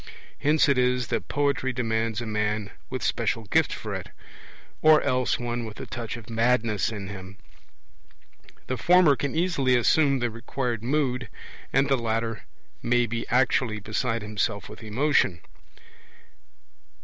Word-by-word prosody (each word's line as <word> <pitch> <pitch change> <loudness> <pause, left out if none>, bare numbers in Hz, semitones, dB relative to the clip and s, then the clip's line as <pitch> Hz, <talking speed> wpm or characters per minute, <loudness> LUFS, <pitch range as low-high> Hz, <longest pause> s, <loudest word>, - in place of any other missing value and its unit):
Hence 150 +2 +3
it 140 -3 +3
is 125 -1 +1
that - - -2
poetry 140 -2 0
demands 115 -2 -1
a - - -4
man 105 -1 -1 0.2
with 130 -3 -4
special 115 -1 0
gift 100 - +2
for - - -5
it, - - -5 0.7
or 155 -1 +7
else 130 -2 +1
one 120 0 -3
with 110 -2 -8
a - - -5
touch 120 -1 -5
of 115 - -12
madness 115 -2 +1
in 100 -3 -6
him; 95 0 -9 1.3
the 130 - -3
former 175 -3 +5
can 140 +2 -3
easily 160 -7 +2
assume 140 +3 +3
the 120 -2 -1
required 115 0 -3
mood, 130 0 -1 0.4
and 135 +1 +3
the 135 - +3
latter 115 -1 -2 0.4
may 120 0 +2
be 115 0 -4
actually 125 -2 +2
beside 115 +2 -2
himself 105 0 -2
with - - -11
emotion. 110 - +1
120 Hz, 145 wpm, -26 LUFS, 110-130 Hz, 1.3 s, or